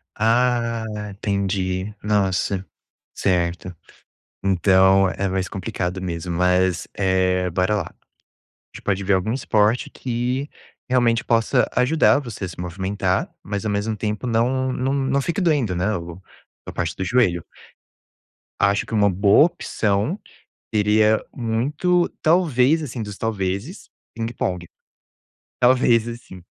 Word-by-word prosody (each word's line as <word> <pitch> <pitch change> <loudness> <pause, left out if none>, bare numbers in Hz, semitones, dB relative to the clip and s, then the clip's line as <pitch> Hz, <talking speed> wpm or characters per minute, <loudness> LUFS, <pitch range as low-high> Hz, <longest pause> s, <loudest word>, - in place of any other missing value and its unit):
Ah, 115 0 +1 0.2
entendi, 95 -1 -2
nossa, 100 -2 0 0.5
certo, 90 0 -1 0.7
então 95 0 +4
é 100 +1 -2
mais 95 0 -2
complicado 95 -2 -4
mesmo. 85 -1 -4
Mas, 90 0 +2
eh, 95 -1 +1
bora 90 +4 +1
lá, 105 - 0
a - - -36 0.8
gente - - -11
pode 100 -1 0
ver 100 +1 +2
algum 95 +4 0
esporte 110 -2 +1
que 125 +3 -2 0.4
realmente 120 -2 +2
possa 115 +2 +2
ajudar 140 +4 +3
você 120 -8 -7
a - - -3
se 85 - -9
movimentar, 95 +1 -1
mas 100 0 -4
ao 105 - -1
mesmo 105 +2 -1
tempo 105 +2 -3
não 125 +3 +1
não 130 +1 -1
não 140 0 +1
fique 170 +7 -2
doendo, 145 - +1
né, 95 +5 0
o 85 +1 -8 0.5
a - - -6
parte - - -2
do 95 - -3
joelho. 90 -5 +2 1.2
Acho 100 +1 +2
que - - -9
uma 105 -2 +4
boa 100 - +5
opção, 110 - -1 0.5
seria 105 +1 +3
muito 145 +10 0
talvez, 155 -3 +3
assim, 125 -4 -5
dos 105 -2 -6
talvezes 105 - -3 0.3
ping-pong. 115 -6 -3 0.9
Talvez, 120 -2 +4
assim, 115 -6 -9
105 Hz, 125 wpm, -22 LUFS, 95-125 Hz, 1.2 s, boa